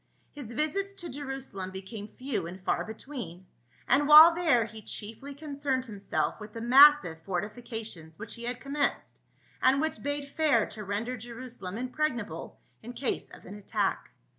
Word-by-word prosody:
His 255 -6 -8
visits 385 - -1
to 350 -3 -6
Jerusalem 270 -9 -5
became 195 +3 -7
few 220 -7 -4
and 180 +2 -8
far 185 - 0
between, 220 - -8 0.4
and 285 +3 +4
while 310 +3 +11
there 315 -9 +3
he 220 0 -10
chiefly 225 +8 -6
concerned 280 -3 -2
himself 195 -9 -2
with 210 0 -10
the 230 - -6
massive 255 - +7
fortifications 205 -3 -5
which 225 - -6
he 235 0 -7
had 245 0 -3
commenced, 280 +1 -2 0.4
and 265 +2 +4
which 315 -7 -1
bade 285 +1 -3
fair 290 -9 +3
to 215 - -8
render 215 +6 -3
Jerusalem 230 -4 -7
impregnable 250 -3 -3 0.2
in 240 +2 -8
case 250 +2 -2
of - - -14
an 190 - -9
attack. 205 -1 -2
240 Hz, 155 wpm, -29 LUFS, 210-285 Hz, 0.4 s, while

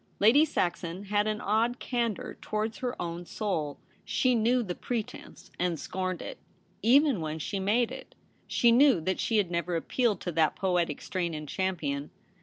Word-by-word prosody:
Lady 230 +9 +6
Saxon 175 - -2
had 205 +1 +1
an 215 0 -1
odd 225 +4 +1
candour 235 -5 -2
towards 215 +1 -2
her 250 -1 -3
own 170 0 -4
soul. 165 -7 -3 0.3
She 255 -1 +2
knew 240 +2 +3
the 180 -5 -3
pre 235 +4 -2
tence - - -13
and 175 -3 0
scorned 185 -1 -3
it, - - -7 0.4
even 265 - +4
when 155 0 -3
she 195 +5 -3
made 220 +5 +2
it. - - -9 0.3
She 235 - +4
knew 255 -3 +6
that 185 +4 -1
she 225 - +1
had 195 -4 +1
never 170 0 -1
appealed 210 +4 +1
to 175 - -3
that 160 -1 +2
poetic 175 -5 0
strain 175 -3 -2
in 155 0 -5
Champion. 150 -4 -2
195 Hz, 175 wpm, -29 LUFS, 170-230 Hz, 0.4 s, Lady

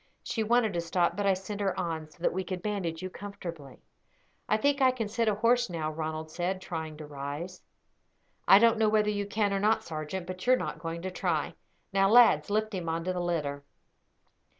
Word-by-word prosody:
She 225 - -2
wanted 225 -1 +2
to 170 - 0
stop, 170 +1 +1
but 205 0 0
I 195 - +4
sent 200 +2 -6
her 195 -2 0
on, 160 -3 -3
so 165 +3 -18
that - - +2
we 190 +1 -2
could 180 -1 -5
bandage 185 -5 -3
you 185 - -3
comfortably." 170 -9 -8 0.7
"I 215 - +4
think 280 +4 +1
I 260 - +6
can 245 -4 -2
sit 225 +2 -1
a 210 - +3
horse 235 +2 +2
now," 160 -3 -3
Ronald 155 0 -4
said, 180 +3 -2
trying 160 -4 -5
to 155 - -8
rise. 145 +5 -6 0.9
"I - - +9
don't 230 +1 +4
know 220 -1 +4
whether 210 -1 +2
you 205 -1 -2
can 205 -1 0
or 195 - +1
not, 220 +2 +2
sergeant; 160 +1 -5
but 185 0 -7
you 255 - +7
are - - +4
not - - -4
going 165 0 -5
to 185 - -3
try. 175 -4 -1 0.4
Now, 195 0 +4
lads, 235 -1 +6
lift 215 +1 0
him 175 -3 -3
on 165 +1 -2
to 185 +1 -1
the 180 - -2
litter." 150 -5 -2
185 Hz, 220 wpm, -29 LUFS, 165-210 Hz, 0.9 s, I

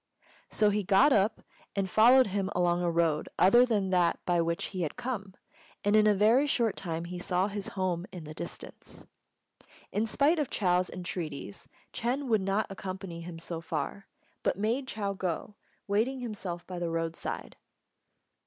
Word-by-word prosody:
So 210 -1 +3
he 210 +1 +1
got 210 +10 +5
up 210 +1 +2 0.3
and 195 -1 0
followed 245 +7 +6
him 195 -1 -1
along 175 0 +2
a 175 - +1
road 165 -2 +1
other 240 +7 +6
than 205 -5 0
that 175 -2 +3
by 175 -1 +2
which 170 0 -1
he 185 - -3
had 155 - -2
come, 200 -7 -4 0.5
and 205 +1 +3
in 215 0 +6
a 210 - +5
very 225 +8 +4
short 235 -7 +1
time 165 -2 -4
he 175 +1 -6
saw 180 +2 +1
his 205 -1 -5
home 185 -1 -1
in 175 -3 -8
the 155 0 -8
distance. - - -8 0.9
In 220 +2 0
spite 295 +8 +3
of 290 - -1
Chou's 180 -2 +1
entreaties, 160 - -6 0.3
Ch'êng 255 +5 -1
would 220 -3 +3
not 195 +2 +1
accompany 185 -3 -6
him 170 0 -7
so 165 0 -6
far, 165 +4 -4 0.3
but - - 0
made 235 +6 0
Chou 200 -5 -2
go, 185 +1 -3 0.3
waiting 225 +7 +1
himself 195 -7 -5
by 180 -1 -6
the 170 -1 -2
roadside. 165 0 -4
190 Hz, 170 wpm, -30 LUFS, 175-215 Hz, 0.9 s, followed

